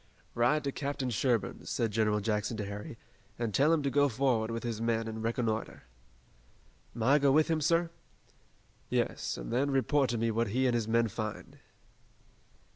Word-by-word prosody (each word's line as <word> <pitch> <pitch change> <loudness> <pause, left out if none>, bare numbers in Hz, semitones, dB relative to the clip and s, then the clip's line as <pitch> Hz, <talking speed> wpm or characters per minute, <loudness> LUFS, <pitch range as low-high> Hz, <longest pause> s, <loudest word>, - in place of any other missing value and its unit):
"Ride 125 +6 +2
to 140 - -1
Captain 140 -2 -3
Sherburne," 115 -4 0
said 115 -3 -1
General 105 -1 +1
Jackson 105 +1 -1
to 105 - -3
Harry, 105 +3 -7 0.4
"and 115 -3 -2
tell 145 +7 +4
him 160 -3 +2
to 140 - 0
go 145 +1 +3
forward 120 -2 +1
with 115 0 -4
his 115 -2 -3
men 115 -1 0
and 110 0 -5
reconnoiter." 115 -1 -2 1.1
"May 115 -2 -2
I 140 +4 +5
go 140 -1 +4
with 155 +3 +3
him, 160 -1 +1
sir?" 165 +2 +2 1.0
"Yes, - - -1
and - - -6
then 135 +4 +1
report 135 0 +2
to 120 - -1
me 115 0 0
what 115 +1 0
he 130 +6 0
and 125 - +2
his 115 -2 0
men 115 +1 +2
find." 110 0 -6
115 Hz, 180 wpm, -31 LUFS, 110-140 Hz, 1.1 s, I